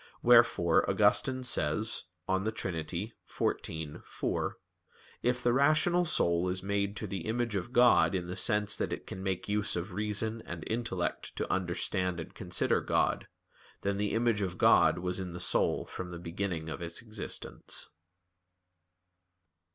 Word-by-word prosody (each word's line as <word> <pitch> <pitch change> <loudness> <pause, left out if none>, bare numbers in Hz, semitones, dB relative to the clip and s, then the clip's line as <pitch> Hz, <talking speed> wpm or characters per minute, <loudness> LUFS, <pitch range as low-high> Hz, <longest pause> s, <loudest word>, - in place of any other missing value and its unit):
Wherefore, 115 -8 +5
Augustine 130 -1 +3
says 105 -3 +2 0.2
(De 95 +3 0
Trin. 95 -4 -4
xiv, 80 -4 -4
4): - - -3 0.6
"If 125 +1 0
the 120 - +3
rational 155 +6 +3
soul 85 - +2
is 95 +1 -2
made 100 0 -1
to - - -3
the 95 -2 -5
image 120 0 -1
of 100 +4 -3
God 120 -5 +5
in 90 -2 -2
the 90 +1 -5
sense 105 -1 +2
that - - -2
it - - -5
can 95 - -7
make 95 -1 -2
use 105 0 +1
of 90 +3 -4
reason 105 +3 -2
and 85 -2 -7
intellect 110 -6 -3
to - - -2
understand 90 0 -1
and 80 - -7
consider - - +1
God, - - 0 0.5
then 100 0 -1
the 105 0 -1
image 115 -2 +2
of 90 -2 -2
God - - +5
was 90 +1 -2
in 90 -2 -5
the 90 - -6
soul - - +1
from 90 - -7
the 85 - -7
beginning 85 -1 -4
of 80 -2 -5
its 85 +6 -4
existence." 110 -2 -5
100 Hz, 150 wpm, -31 LUFS, 90-115 Hz, 0.6 s, Wherefore